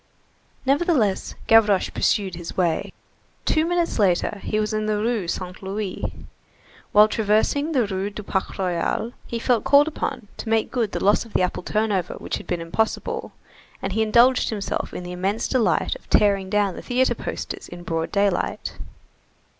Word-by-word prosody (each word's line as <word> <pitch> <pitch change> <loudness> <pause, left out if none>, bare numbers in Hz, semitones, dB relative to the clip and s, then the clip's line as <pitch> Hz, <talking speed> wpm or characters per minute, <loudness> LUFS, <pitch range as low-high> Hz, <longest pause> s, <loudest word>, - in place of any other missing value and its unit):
Nevertheless, 275 - +1
Gavroche 210 -4 +4
pursued 195 -4 +1
his 170 -1 -7
way. 170 -3 0 0.5
Two 315 +1 +2
minutes 345 -6 0
later 200 +1 +2
he 215 - -1
was 215 0 -1
in 215 0 -1
the 215 -1 +1
Rue 220 -3 -1
Saint 180 +1 -4
Louis. 195 0 -4 0.9
While 210 +1 +7
traversing 220 +8 +1
the 250 -5 +3
Rue 195 0 -2
du 210 +1 -8
Parc 190 -1 -2
Royal, 185 +4 -1 0.2
he 235 - -3
felt 230 -1 +1
called 285 +1 +5
upon 295 -7 -4
to 225 - -6
make 225 -1 +1
good 230 -5 -1
the - - -2
loss 205 +2 +4
of 230 - -16
the - - +2
apple 180 - -1
turnover 210 -2 -1
which - - -4
had - - -11
been 175 -2 -2
impossible, 215 +7 -2 0.5
and - - -3
he 220 - +1
indulged 235 +4 +4
himself 205 -3 -3
in - - -6
the 180 - -7
immense 195 +5 -1
delight 255 - +1
of - - -15
tearing 195 -2 +3
down 205 -2 +1
the - - -7
theatre 255 +1 +1
posters - - -6
in 175 0 -10
broad 165 -1 -2
daylight. 200 -2 0
210 Hz, 170 wpm, -23 LUFS, 190-230 Hz, 0.9 s, While